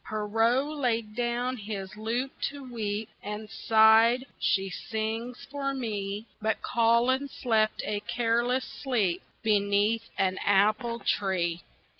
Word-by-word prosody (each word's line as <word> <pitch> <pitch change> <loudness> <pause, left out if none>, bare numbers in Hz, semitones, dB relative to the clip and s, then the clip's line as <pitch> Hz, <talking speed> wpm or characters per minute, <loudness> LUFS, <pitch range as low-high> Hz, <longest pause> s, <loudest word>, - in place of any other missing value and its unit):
Pierrot 225 +5 +1
laid 235 -8 -1
down 245 +1 -1
his 200 -3 -6
lute 235 +5 -2 0.2
to 280 0 -9
weep, 220 -4 -3
And 210 +1 -6
sighed, 225 +3 +5
"She 195 0 +1
sings 225 +4 -4
for 275 -1 -3
me," 210 -4 -3 0.2
But 220 +1 -1
Colin 240 +4 +2
slept 220 -4 0
a 210 -1 -1
careless 240 +4 0
sleep 210 -10 -1 0.2
Beneath 210 +1 +2
an 190 -1 +1
apple 215 +4 +2
tree. 175 -4 0
225 Hz, 115 wpm, -28 LUFS, 210-245 Hz, 0.2 s, sighed